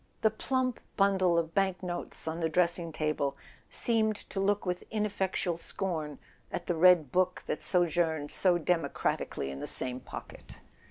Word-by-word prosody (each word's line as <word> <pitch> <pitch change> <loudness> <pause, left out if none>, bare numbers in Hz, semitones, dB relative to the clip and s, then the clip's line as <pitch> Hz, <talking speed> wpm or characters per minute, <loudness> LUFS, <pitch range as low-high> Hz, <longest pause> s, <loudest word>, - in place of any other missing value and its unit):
The 220 - +5
plump 255 +2 -1 0.2
bundle 190 -3 +3
of 165 -1 0
bank 190 -1 +1
notes 175 -2 -4
on 160 +1 -2
the 165 -1 0
dressing 170 0 +1
table 150 -3 -1 0.3
seemed 220 -2 +3 0.2
to 195 - -3
look 200 +1 +1
with 180 -1 -2
ineffectual 195 -5 -1
scorn 165 -4 -3 0.3
at - - -4
the 175 - 0
red 170 -4 +5
book 185 0 +1
that - - -3
sojourned 165 -4 +1
so 180 -2 +3
democratically 165 - -1
in 70 - -7
the - - -5
same 125 0 -1
pocket. - - -10
175 Hz, 155 wpm, -30 LUFS, 160-195 Hz, 0.3 s, The